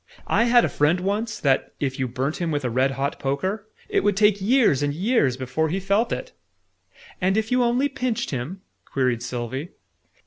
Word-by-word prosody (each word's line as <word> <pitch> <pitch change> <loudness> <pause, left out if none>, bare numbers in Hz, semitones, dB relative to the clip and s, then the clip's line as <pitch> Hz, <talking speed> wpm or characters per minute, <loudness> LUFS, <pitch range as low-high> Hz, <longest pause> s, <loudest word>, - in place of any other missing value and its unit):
I 230 - +2
had 240 0 +5
a - - +1
friend, 155 +5 +2
once, 210 +4 -2
that, 135 -2 +1
if 135 -1 -2
you 130 - 0
burnt 130 +5 -2
him 170 -2 -2
with 145 -3 -1
a 125 - -1
red 130 +3 +2
hot 140 +1 -2
poker, 190 +10 -2 0.2
it - - +1
would 205 -1 +2
take 210 -1 +4
years 220 - +3
and 145 0 -1
years 175 - +1
before 145 +5 -1
he 185 +5 -1
felt 200 +4 +1
it!" - - -4 0.9
"And 190 +3 +2
if 220 +1 -1
you 250 0 +3
only 245 +3 +2
pinched 255 -5 -2
him?" 145 +9 -4 0.2
queried 125 -3 -1
Sylvie. 125 +5 -4
175 Hz, 195 wpm, -24 LUFS, 135-215 Hz, 0.9 s, had